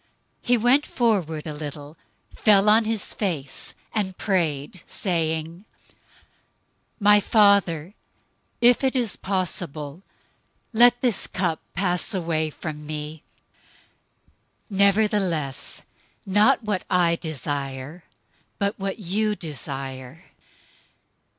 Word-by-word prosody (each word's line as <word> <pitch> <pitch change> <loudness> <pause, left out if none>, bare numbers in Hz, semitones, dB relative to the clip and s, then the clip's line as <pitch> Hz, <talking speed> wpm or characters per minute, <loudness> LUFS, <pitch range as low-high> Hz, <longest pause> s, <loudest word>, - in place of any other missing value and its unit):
026:039 - - -15
He 245 0 +5
went 245 +6 +3
forward 185 -11 0
a 155 - -5
little, 150 0 -8 0.4
fell 205 -2 +4
on 220 +1 +5
his 220 -2 -2
face, 160 -10 -3 0.2
and 190 -4 -2
prayed, 165 -4 -1
saying, 165 -1 -2 1.4
"My 205 0 +6
Father, 200 -6 +3 0.7
if 245 +2 +5
it 265 0 +1
is 235 -7 +1
possible, 170 -5 -4 0.7
let 245 +2 +6
this 240 -6 +1
cup 175 -4 -1 0.2
pass 180 +2 0
away 165 -3 -1
from 150 0 -7
me; 150 0 -5 1.5
nevertheless, 195 -8 +1 0.4
not 205 +4 +3
what 205 -4 -2
I 175 -2 +3
desire, 145 0 -5 0.5
but 200 0 -1
what 195 0 -3
you 210 +2 -1
desire." 135 -3 -7
180 Hz, 100 wpm, -24 LUFS, 155-210 Hz, 1.5 s, My